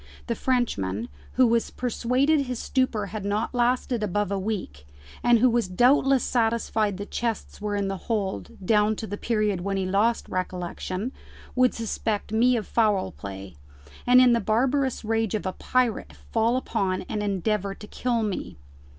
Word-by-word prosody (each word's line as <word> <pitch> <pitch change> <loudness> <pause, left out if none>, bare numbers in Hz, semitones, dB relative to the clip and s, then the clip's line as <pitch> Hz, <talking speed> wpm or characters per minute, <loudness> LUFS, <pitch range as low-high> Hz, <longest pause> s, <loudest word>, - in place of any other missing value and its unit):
the 235 - -1
Frenchman, 120 - -1 0.2
who 255 - +5
was 230 -1 +2
persuaded 255 +4 +1
his 250 -1 -3
stupor 245 -4 0
had 215 -2 -4
not 205 +4 -1
lasted 245 -1 +1
above 205 0 -1
a 200 - 0
week, 185 - -4 0.3
and 240 -1 +5
who 245 +3 +5
was 235 -3 +1
doubtless 260 +7 +4
satisfied 225 -3 0
the 200 - -5
chests 230 -1 -4
were 210 -1 -2
in 200 -1 0
the 195 0 -2
hold 195 - -2
down 210 +1 +3
to 220 - -5
the 205 - -4
period 210 -4 0
when 195 +1 -1
he 190 - -1
lost 205 +5 +1
recollection, 185 +4 -3 0.4
would 255 -1 +3
suspect 220 -2 -2
me 240 +3 +4
of 215 - -3
foul 210 -5 +1
play, 95 -4 -9 0.5
and 250 +1 +7
in 250 -1 +6
the 235 - +3
barbarous 255 +4 +1
rage 225 -1 0
of 210 - -3
a 185 - -1
pirate 250 0 0 0.2
fall 230 +2 +2
upon 195 -7 -1
and 215 -1 -4
endeavour 200 0 -1
to - - -11
kill 235 +1 -1
me. 190 - -4
220 Hz, 170 wpm, -25 LUFS, 195-240 Hz, 0.5 s, and